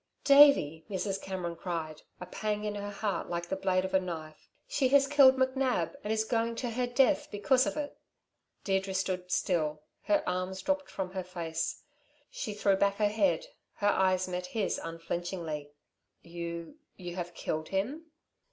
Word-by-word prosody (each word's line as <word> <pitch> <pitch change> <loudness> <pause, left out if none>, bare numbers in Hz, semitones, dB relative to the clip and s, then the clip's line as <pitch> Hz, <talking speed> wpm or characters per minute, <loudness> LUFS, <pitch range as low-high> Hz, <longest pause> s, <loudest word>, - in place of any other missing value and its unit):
"Davey," 275 - +6
Mrs. 195 0 -2
Cameron 180 -3 -4
cried, 165 -3 -4 0.2
a 180 - -6
pang 210 +3 -3
in 210 -1 -2
her 205 0 -4
heart 200 -3 -2
like 170 0 -3
the 190 - 0
blade 190 -1 +1
of 190 - -5
a 190 - +5
knife. 160 -4 -7 0.2
"She 405 - +2
has 275 +1 +5
killed 275 -2 +6
McNab, 260 -1 +1
and 210 - -2
is 220 0 +2
going 230 +1 0
to 240 0 -3
her 245 +2 -1
death 245 +2 +3
because 210 +6 +2
of - - -3
it." 290 -1 -4 0.7
Deirdre 195 -1 0
stood 185 -1 -2
still. 155 -6 0 0.2
Her 305 -1 +1
arms 185 +1 -2
dropped 285 +3 0
from 190 -2 -4
her 190 -1 -3
face. 170 -3 -4 0.5
She 215 -7 -4
threw 200 -1 +3
back 200 0 +2
her 210 0 +2
head, 195 -6 +1 0.3
her 205 -1 +2
eyes 185 -2 +2
met 180 0 -3
his 205 +1 -1
unflinchingly. 165 -2 -4 0.5
"You 170 - -6 0.2
you 175 -2 -7
have 175 -1 -5
killed 155 0 -3
him?" 260 +13 -2
190 Hz, 170 wpm, -30 LUFS, 175-225 Hz, 0.7 s, Davey